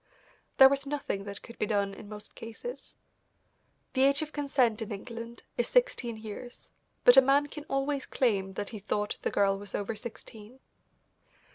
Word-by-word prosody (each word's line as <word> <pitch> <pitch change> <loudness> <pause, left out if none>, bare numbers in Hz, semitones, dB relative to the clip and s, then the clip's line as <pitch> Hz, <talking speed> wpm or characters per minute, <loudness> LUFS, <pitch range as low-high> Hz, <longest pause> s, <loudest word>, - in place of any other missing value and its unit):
There 265 - +11
was 275 +1 0
nothing 275 -9 -3
that 200 0 -7
could 235 - -12
be 210 - +1
done 200 -2 0
in 205 +1 -11
most 210 -1 -9
cases. 230 - -8 1.0
The 260 - +1
age 280 +2 +4
of 310 - -8
consent 260 -6 +1
in 220 - -4
England 230 +3 -7 0.2
is 240 - +2
sixteen 250 - +1
years, 220 +3 -9 0.3
but 245 +1 +9
a - - +12
man 275 +2 +4
can 295 0 -9
always 275 -1 -1
claim 195 -7 +1
that 205 +1 -4
he 215 - -7
thought 210 +1 -2
the - - 0
girl 195 -1 +2
was 205 -1 -6
over 205 +2 -2
sixteen. 225 +1 -10
235 Hz, 170 wpm, -30 LUFS, 205-275 Hz, 1.0 s, a